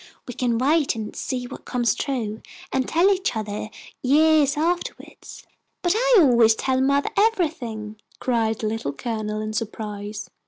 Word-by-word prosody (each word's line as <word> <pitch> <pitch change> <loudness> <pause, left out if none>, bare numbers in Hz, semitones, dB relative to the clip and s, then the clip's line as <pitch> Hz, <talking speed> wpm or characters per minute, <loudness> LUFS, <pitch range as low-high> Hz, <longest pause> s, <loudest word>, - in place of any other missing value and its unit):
We 245 - -5
can 235 -1 0
wait 290 +3 +2
and 220 -2 -6
see 250 -1 -3
what - - -9
comes 240 -2 +1
true, 225 -6 -3 0.3
and 260 -1 0
tell 350 +5 +4
each 380 -8 -2
other 215 0 -4 0.3
years 295 +1 +4
afterward." 345 +3 -2 0.7
"But 350 - +3
I - - +3
always 235 -6 +5
tell 260 +3 0
mothah 280 +1 +2
everything," 270 - 0 0.2
cried 225 -3 0
the 220 - -3
Little 215 -10 -3
Colonel, 215 - -3
in 215 0 -4
surprise. 210 -1 -5
245 Hz, 150 wpm, -23 LUFS, 220-295 Hz, 0.7 s, always